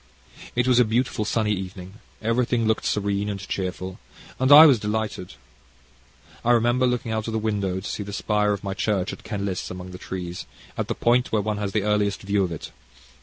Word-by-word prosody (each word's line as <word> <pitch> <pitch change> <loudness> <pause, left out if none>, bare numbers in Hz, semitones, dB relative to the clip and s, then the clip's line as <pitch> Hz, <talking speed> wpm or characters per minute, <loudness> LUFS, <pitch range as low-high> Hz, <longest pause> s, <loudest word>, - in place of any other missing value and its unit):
It 125 +1 +1
was 125 -1 +5
a - - +7
beautiful 115 -1 0
sunny 110 0 0
evening, 95 +1 -7 0.2
everything 115 +1 +1
looked 110 0 0
serene 100 0 0
and 100 -1 -4
cheerful, 95 -1 -4 0.4
and 130 +2 +2
I 150 +2 +12
was 135 -7 +6
delighted. 105 -3 -3 1.1
I 120 - +4
remember 120 +2 +3
looking 125 -2 -1
out 110 0 -2
of 115 - -3
the - - 0
window 100 -4 -1
to 100 - -6
see - - -4
the 100 0 -6
spire 105 +1 +1
of 100 - -3
my 100 -1 -3
church 95 -1 -1
at - - -11
Kenlis 100 -3 -3
among 90 0 -8
the 90 - -9
trees, 90 -2 -6 0.3
at - - -2
the - - -2
point 120 +2 +2
where 105 -2 +1
one 105 0 -2
has 100 -1 -2
the 105 - +1
earliest 105 -1 0
view 100 0 +1
of 90 - -2
it. 80 - -7
105 Hz, 205 wpm, -24 LUFS, 95-115 Hz, 1.1 s, I